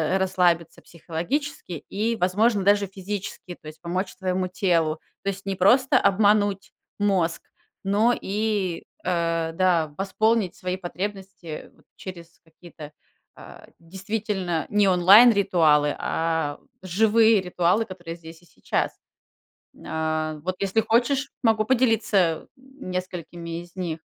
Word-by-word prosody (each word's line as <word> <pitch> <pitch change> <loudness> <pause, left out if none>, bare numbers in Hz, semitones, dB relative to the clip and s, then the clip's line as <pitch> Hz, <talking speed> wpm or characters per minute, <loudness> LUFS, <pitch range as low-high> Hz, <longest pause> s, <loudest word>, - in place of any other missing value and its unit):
э, - - +4
расслабиться 180 -3 +1
психологически 180 - -4 0.2
и, 220 +3 -1
возможно, 205 +2 +2
даже 200 0 +3
физически, 190 -1 -6
то 155 - -14
есть 155 +1 -11
помочь 185 +2 -3
твоему 185 0 -1
телу. 170 -4 0 0.2
То 200 - -1
есть 195 0 -6
не 195 -1 -2
просто 240 +8 +4
обмануть 205 0 +2 0.3
мозг, 185 -5 +1 0.4
но 210 +5 +3
и, 200 -3 -2 0.2
э, 165 -2 0
да, 165 -4 +1
восполнить 215 0 +1
свои 180 0 -3
потребности 190 -3 -6
вот - - -27
через 175 -2 -10
какие-то, 160 -2 -13 0.4
а, - - -13
действительно 190 -1 -3
не 205 -1 +3
онлайн 195 +7 +7
ритуалы, 160 -8 +3
а 160 -3 -1 0.2
живые 220 +3 +3
ритуалы, 180 +4 +1
которые 175 -4 -8
здесь 165 0 -13
и - - -22
сейчас. - - -2 0.9
А, 155 0 -2
вот 185 +1 -2
если 200 +3 +1
хочешь, 265 +5 +1
могу 220 -3 +3
поделиться, 220 -9 +2
м, 265 -5 -11
несколькими 175 -2 -5
из 175 0 -16
них. 170 -4 -4
185 Hz, 125 wpm, -24 LUFS, 170-205 Hz, 0.9 s, онлайн